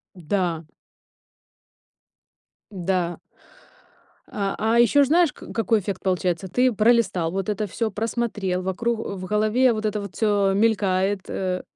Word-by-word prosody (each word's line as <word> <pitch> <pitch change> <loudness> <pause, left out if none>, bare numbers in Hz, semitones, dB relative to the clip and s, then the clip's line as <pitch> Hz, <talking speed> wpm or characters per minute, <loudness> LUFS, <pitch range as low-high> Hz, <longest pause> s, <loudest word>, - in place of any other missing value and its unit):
Да. 170 -2 -2 2.1
Да. 180 -2 -2 1.1
А, 200 -1 -2
а 225 +2 +2
ещё 280 +4 +5
ж - - 0
знаешь, 335 +1 +4
ка - - -12
какой 225 -1 +1
эффект 195 -1 -5
получается? 185 0 -1
Ты 250 +3 +2
пролистал 215 -7 +2
вот 195 +1 -3
это 210 +1 -1
всё, 220 +3 -2
просмотрел, 210 -4 -2
вокруг 225 +5 -2
в 190 -4 -5
голове 215 +5 +2
вот 215 0 -4
это 210 -1 -1
вот 200 -2 -9
всё 205 -3 +2
мелькает, 200 -2 +1
э. 185 -1 -2
200 Hz, 135 wpm, -23 LUFS, 185-225 Hz, 2.1 s, ещё